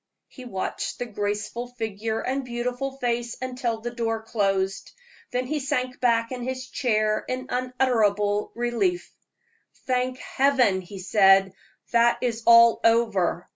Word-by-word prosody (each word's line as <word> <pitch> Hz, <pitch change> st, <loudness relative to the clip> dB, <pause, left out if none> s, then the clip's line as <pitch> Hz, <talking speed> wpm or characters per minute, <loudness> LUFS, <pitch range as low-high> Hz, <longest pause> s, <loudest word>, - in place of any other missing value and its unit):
He 255 Hz, -, -12 dB
watched 190 Hz, -6 st, -4 dB
the 245 Hz, -, -3 dB
graceful 210 Hz, +2 st, -3 dB
figure 225 Hz, -2 st, -4 dB
and 270 Hz, +2 st, -2 dB
beautiful 250 Hz, +2 st, -4 dB
face 240 Hz, -2 st, -2 dB
until 250 Hz, -3 st, -3 dB
the 240 Hz, +1 st, -4 dB
door 225 Hz, -2 st, -2 dB
closed, 195 Hz, -3 st, -1 dB, 0.4 s
then 250 Hz, -1 st, -2 dB
he 300 Hz, +4 st, -2 dB
sank 255 Hz, -3 st, -2 dB
back 230 Hz, -1 st, +2 dB
in 250 Hz, -1 st, -5 dB
his 260 Hz, +1 st, -4 dB
chair 215 Hz, -4 st, 0 dB
in 255 Hz, 0 st, -3 dB
unutterable 225 Hz, -5 st, +1 dB
relief. 240 Hz, +10 st, -1 dB, 0.7 s
"Thank 255 Hz, 0 st, 0 dB
Heaven!" 255 Hz, -9 st, +2 dB
he 190 Hz, +2 st, -10 dB
said, 195 Hz, 0 st, +4 dB, 0.4 s
"that 235 Hz, 0 st, +4 dB
is 235 Hz, -2 st, -1 dB
all 235 Hz, 0 st, +7 dB
over. 220 Hz, -7 st, +2 dB
235 Hz, 135 wpm, -25 LUFS, 215-255 Hz, 0.7 s, all